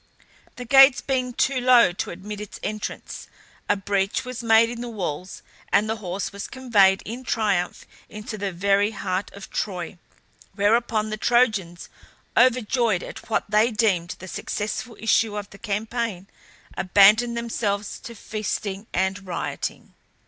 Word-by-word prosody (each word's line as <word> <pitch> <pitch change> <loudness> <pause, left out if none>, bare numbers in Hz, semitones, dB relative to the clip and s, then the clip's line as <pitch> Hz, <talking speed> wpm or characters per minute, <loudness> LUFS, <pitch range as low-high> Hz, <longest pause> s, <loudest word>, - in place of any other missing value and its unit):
The 250 - -7
gates 270 +1 +7
being 255 -2 -1
too 260 +1 0
low 245 -5 +6
to 185 - -4
admit 205 +4 -7
its 210 - -9
entrance, 215 0 -5 0.4
a 205 - +4
breach 195 +2 -1
was 250 -1 -6
made 225 0 +5
in 235 0 -6
the 245 - -5
walls, 185 -4 -5 0.3
and 215 - +3
the 220 +1 -2
horse 190 -1 -4
was 200 0 -6
conveyed 210 -8 +3
in 240 +4 -6
triumph 205 -7 -1 0.2
into 215 +2 -7
the 200 -2 -3
very 200 +3 +2
heart 190 -2 -3
of 200 -1 -11
Troy; 180 -3 -4 0.6
whereupon 215 +1 +1
the 215 - -3
Trojans, 215 -8 +1 0.5
overjoyed 240 -5 +3
at - - -10
what 220 - +1
they 215 +2 +3
deemed 205 -7 0
the 185 - -10
successful 215 +4 -4
issue 220 -1 +2
of 205 -1 -6
the 200 - -13
campaign, 220 -2 -3 0.5
abandoned 210 +5 +5
themselves 210 -3 -2
to 235 - -10
feasting 210 -1 -4
and 190 +1 -1
rioting. 175 - -4
210 Hz, 145 wpm, -24 LUFS, 195-235 Hz, 0.6 s, gates